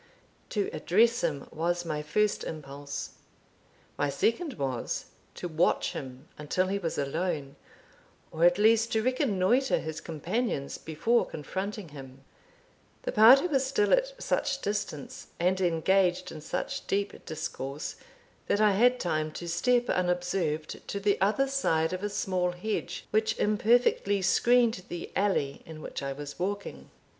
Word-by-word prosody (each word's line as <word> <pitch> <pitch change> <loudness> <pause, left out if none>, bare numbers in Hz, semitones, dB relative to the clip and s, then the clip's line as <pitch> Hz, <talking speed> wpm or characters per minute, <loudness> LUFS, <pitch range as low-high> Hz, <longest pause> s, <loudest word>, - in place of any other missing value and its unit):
To 205 -4 0
address 230 +6 +3
him 150 -5 -1
was 175 +2 -1
my 155 -2 -2
first 210 +8 0
impulse; 140 -2 -6 0.9
my 145 - +1
second 270 - 0
was, 130 - -3 0.3
to 180 - -4
watch 165 +1 +1
him 130 -1 -8
until 185 +5 0
he 200 +1 0
was 165 -4 -3
alone, 145 -1 -2 0.8
or 160 - -1
at 175 +1 +6
least 225 +2 +4
to 220 -1 +2
reconnoitre 255 -1 +2
his 160 -1 -5
companions 165 - -2
before 225 +10 +1
confronting 190 +4 -5
him. 135 -2 -11 0.8
The - - -2
party 240 +8 +8
was 275 -7 +2
still 275 - +2
at - - +2
such - - -1
distance, 200 -8 -4
and 185 +2 +2
engaged 180 +1 +2
in 155 - -8
such - - -4
deep 200 +1 -2
discourse, 145 -2 -5 0.5
that 205 - +2
I 215 -1 +5
had 245 +5 +4
time 155 -3 -1
to 175 - -6
step 245 +8 +2
unobserved 180 -3 -1
to 200 - -3
the 200 -1 +1
other 220 +8 +3
side 165 -12 +1
of 185 - -3
a 205 - -2
small 185 -3 -1
hedge, 210 +5 -4
which 220 +1 +1
imperfectly 210 -2 +2
screened 235 +2 +3
the 175 -1 -6
alley 190 -9 0
in 160 -1 -10
which - - -6
I 140 0 -3
was 145 +2 -7
walking. 200 +3 -4
185 Hz, 145 wpm, -29 LUFS, 155-215 Hz, 0.9 s, party